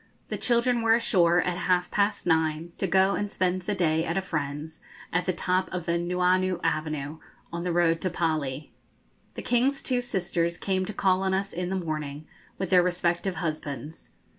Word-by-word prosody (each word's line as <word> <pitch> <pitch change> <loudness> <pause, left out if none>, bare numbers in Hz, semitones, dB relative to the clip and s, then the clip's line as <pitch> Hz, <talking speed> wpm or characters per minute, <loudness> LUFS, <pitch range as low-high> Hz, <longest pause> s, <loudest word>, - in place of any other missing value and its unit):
The - - -2
children 240 0 +2
were 225 0 +5
ashore 175 -6 +3
at 180 -1 -1
half 180 0 +1
past 205 0 +1
nine, 160 0 +1
to 195 - 0
go 190 +2 +4
and 205 0 -2
spend 185 -1 0
the 205 +3 -2
day 160 -3 +2
at 170 +2 -2
a - - +2
friend's, 150 -1 -4 0.3
at 180 0 0
the - - +3
top 185 +1 -1
of 180 -2 -4
the 170 0 +1
Nuuanu 180 +1 +1
Avenue, 155 -2 -2 0.3
on 170 - -3
the 175 0 -1
road 165 -1 +2
to 185 - 0
the 175 - -11
Pali. 155 -4 -1 0.6
The - - -6
King's 255 +3 +2
two 250 -2 +1
sisters 175 -6 -1
came 185 -1 -1
to 215 - -5
call 190 -2 +2
on 190 0 +1
us 195 +1 -2
in 180 +1 -3
the 190 - -1
morning 155 -4 -4 0.3
with 190 -1 -3
their 180 -1 +7
respective 175 +1 0
husbands. 155 -3 -5
180 Hz, 190 wpm, -27 LUFS, 165-190 Hz, 0.6 s, their